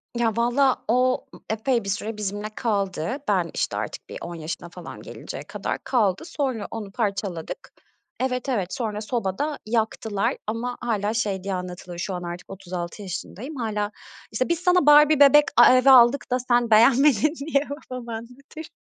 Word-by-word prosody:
Ya, 235 -2 +2
vallahi 250 +3 +2
o, 255 +2 +2
ııı, - - -14
epey 230 +2 0
bir 195 - -5
süre 210 +2 -3
bizimle 205 +1 -4
kaldı. 200 - -1
Ben, - - +1
işte, - - -2
artık - - -6
bir - - -6
10 170 0 -6
yaşına 165 +2 -6
falan 175 -1 -10
gelinceye - - -8
kadar - - -4
kaldı. 210 - +1
Sonra 270 - -3
onu 215 -3 -6
parçaladık. 200 -6 -3 0.5
Evet, 255 +1 -1
evet. 195 -8 -1
Sonra 215 -3 -3
sobada 235 +6 -2
yaktılar 220 -2 -1
ama 235 +3 -3
hâlâ 215 -3 -1
şey 205 -4 -1
diye 195 0 -3
anlatılır: 180 -1 -6
Şu 185 +3 -3
an 180 -1 -5
artık 175 +1 -7
36 185 0 -6
yaşındayım, 205 - -6
hâlâ, 210 -4 -2 0.4
işte, 255 +6 -1
"Biz 340 -1 +1
sana 360 -2 +3
Barbie 295 0 +7
bebek 290 +1 +8 0.3
e - - +6
evi 255 +1 +5
aldık 250 +1 +6
da 250 - +2
sen 240 -1 +1
beğenmedin." 260 +4 +5
diye 280 -3 +2 0.3
babam 250 -2 -7
anlatır. 250 +7 -9
225 Hz, 165 wpm, -24 LUFS, 195-255 Hz, 0.5 s, bebek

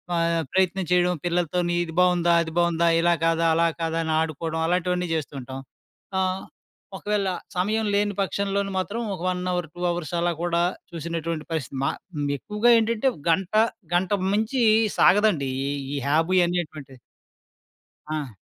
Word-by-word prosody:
ఆహ్, 170 0 +1
ప్రయత్నం 190 0 +1
చేయడము. 180 0 +3
పిల్లలతోని 175 0 0
ఇది 165 - -8
బావుందా? 175 -1 +3
అది 160 -1 -4
బావుందా? 170 -1 +2
ఇలా 175 0 +4
కాదా? 165 0 +2
అలా 170 +1 +3
కాదా? 165 0 -1
అని 160 - -1
ఆడుకోవడం 160 +1 -3
అలాటివన్నీ 180 +1 0
చేస్తూ 155 -2 -4
ఉంటాం. 130 +1 -7 0.6
ఆహ్, 185 0 0 0.6
ఒకవేళ 205 -1 -1 0.3
సమయం 215 +5 0
లేని 205 0 +1
పక్షంలోను 200 0 -1
మాత్రం 195 +4 -2
ఒక 185 - -7
వన్ 180 0 -1
అవర్, 175 -2 -2
2 175 - -8
అవర్స్ 170 -1 -4
అలా 175 0 +1
కూడా 170 0 +1 0.3
చూసినటువంటి 165 -1 -4
పరిస్థితి. 140 -4 -3
మా - - +2 0.3
హ్మ్. 145 -1 -1
ఎక్కువగా 210 - 0
ఏంటంటే 230 +3 +1 0.2
గంటా, 190 +6 +3 0.3
గంటకు 185 +2 +1
మించి 220 +5 0 0.4
సాగదండి 185 -8 +4 0.2
ఈ - - -1 0.2
ఈ - - -2
హాబీ 165 +5 +2
అనేటువంటిది. 155 -7 -4 1.1
ఆ! 145 -6 -3
175 Hz, 145 wpm, -24 LUFS, 165-190 Hz, 1.1 s, ఇలా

